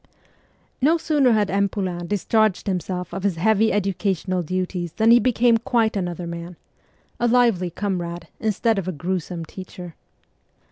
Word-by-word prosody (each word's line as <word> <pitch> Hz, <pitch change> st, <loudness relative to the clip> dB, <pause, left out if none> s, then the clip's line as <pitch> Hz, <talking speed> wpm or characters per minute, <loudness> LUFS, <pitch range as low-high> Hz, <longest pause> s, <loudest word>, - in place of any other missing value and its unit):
No 315 Hz, +6 st, +4 dB
sooner 295 Hz, -6 st, +2 dB
had 210 Hz, -2 st, +1 dB
M. 200 Hz, +1 st, +2 dB
Poulain 180 Hz, -3 st, -3 dB
discharged 210 Hz, 0 st, +1 dB
himself 180 Hz, -2 st, -3 dB
of 195 Hz, -, -4 dB
his 195 Hz, -2 st, 0 dB
heavy 220 Hz, +5 st, +3 dB
educational 190 Hz, -2 st, -1 dB
duties 180 Hz, 0 st, -3 dB
than 225 Hz, +1 st, +3 dB
he 240 Hz, -, +8 dB
became 240 Hz, -2 st, +3 dB
quite 230 Hz, -3 st, +1 dB
another 175 Hz, -2 st, -3 dB
man 170 Hz, +1 st, -7 dB, 0.6 s
a 240 Hz, -, +2 dB
lively 230 Hz, -7 st, +3 dB
comrade 175 Hz, -2 st, -4 dB
instead 220 Hz, 0 st, +1 dB
of 185 Hz, -, -5 dB
a -, -, 0 dB
gruesome 175 Hz, +1 st, -4 dB
teacher. 180 Hz, 0 st, -9 dB
190 Hz, 145 wpm, -22 LUFS, 175-220 Hz, 0.6 s, he